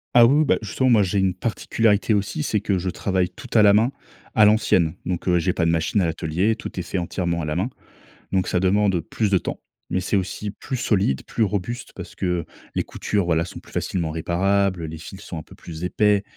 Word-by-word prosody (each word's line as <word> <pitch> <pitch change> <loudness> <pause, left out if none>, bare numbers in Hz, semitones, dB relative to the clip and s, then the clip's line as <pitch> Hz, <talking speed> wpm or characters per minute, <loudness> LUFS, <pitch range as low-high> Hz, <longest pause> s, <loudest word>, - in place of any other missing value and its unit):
Ah 120 -1 +9
oui, 140 +5 +4
oui 155 - +4
bah - - +3
justement 130 +5 +1
moi, 110 -4 +5
j'ai 100 +1 0
une 95 -2 +1
particularité 110 +1 +1
aussi, 105 +10 -1
c'est 110 -8 0
que 100 -2 0
je 90 +1 -2
travaille 95 -1 0
tout 90 +7 -12
à 110 - +6
la 100 -1 +7
main, 115 +5 +3 0.4
à 110 - +5
l'ancienne, 105 -6 +3
donc 90 +1 -3
heu, 90 -1 +4
j'ai 85 +2 +1
pas 85 - 0
de - - +3
machine 85 +5 +1
à - - +2
l'atelier, 85 +7 0
tout 115 -5 -7
est - - 0
fait 90 - -4
entièrement 85 -1 -2
à - - -2
la 75 0 -2
main, 95 +8 0 0.6
donc 95 -1 +1
ça 90 - +1
demande 95 0 +2
plus 105 +6 -1
de 95 - +4
temps, - - -4 0.3
mais 95 - +1
c'est 95 +3 -1
aussi 100 +2 -3
plus 130 +6 -5
solide, 95 - +1
plus 115 - 0
robuste 105 +4 -3
parce - - -9
que 90 -2 -1 0.3
les - - 0
coutures 100 -3 -2
voila 85 -1 +1
sont 85 - -9
plus - - -18
facilement 85 -4 -2
réparables, 90 +2 0
les 80 +1 -6
fils 95 +5 -10
sont 85 - -7
un 80 - -6
peu - - -16
plus 80 0 -9
épais. 105 +2 +2
95 Hz, 235 wpm, -23 LUFS, 85-105 Hz, 0.6 s, Ah